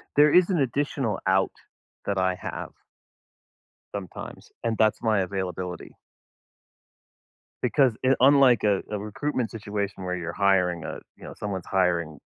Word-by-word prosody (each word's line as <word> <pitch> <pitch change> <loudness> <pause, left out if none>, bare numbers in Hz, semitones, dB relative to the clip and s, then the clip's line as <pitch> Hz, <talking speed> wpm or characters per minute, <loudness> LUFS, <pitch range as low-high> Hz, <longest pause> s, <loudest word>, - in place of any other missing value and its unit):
There 150 +1 +6
is 180 +1 +6
an 175 -5 +1
additional 135 -3 -1
out 95 0 +3 0.5
that 100 -1 -1
I 95 0 +1
have - - -6 1.2
sometimes, 95 -4 -8
and 115 -1 -1
that's 110 +1 +2
my 110 -3 +2
availability. 90 -2 -4 1.7
Because 130 -5 +3
i 130 - +5
unlike 135 -2 +6
a 100 -2 +2
a 105 - -2
recruitment 110 +3 -2
situation 100 -3 -4
where 90 0 -2
you're 85 -1 -4
hiring 90 -4 +2
a - - -5 0.2
you - - -16
know, - - -8
someone's 100 -4 -4
hiring 85 -5 0
100 Hz, 135 wpm, -26 LUFS, 95-120 Hz, 1.7 s, There